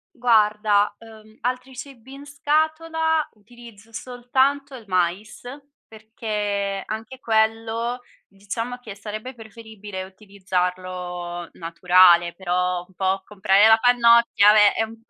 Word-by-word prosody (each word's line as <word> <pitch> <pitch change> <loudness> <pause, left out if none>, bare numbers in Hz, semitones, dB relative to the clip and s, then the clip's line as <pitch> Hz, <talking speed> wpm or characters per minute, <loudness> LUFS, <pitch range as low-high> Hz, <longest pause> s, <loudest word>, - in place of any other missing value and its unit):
Guarda, 210 -4 +2
uhm, 220 -1 -16
altri 255 +2 -4
cibi 265 -1 -11
in 280 +1 -11
scatola, 315 +2 0
utilizzo 225 0 -17
soltanto 260 +4 -1
il 240 - -11
mais, 185 +3 -2 0.5
perché 210 -3 -4
anche 225 +4 -7
quello 225 +1 -1 0.3
diciamo 215 +5 -6
che 225 -5 -10
sarebbe 215 +5 -8
preferibile 220 -4 -10
utilizzarlo 180 -3 -5
naturale, 175 0 +4
però 180 0 -1
un 190 - -25
po' 190 +1 -1
comprare 200 +1 +3
la 220 - +6
pannocchia, 235 -3 +4
vabbè 210 -1 +5
è - - -15
è - - +3
un 225 0 -9
p 230 - -36
220 Hz, 120 wpm, -22 LUFS, 195-240 Hz, 0.5 s, la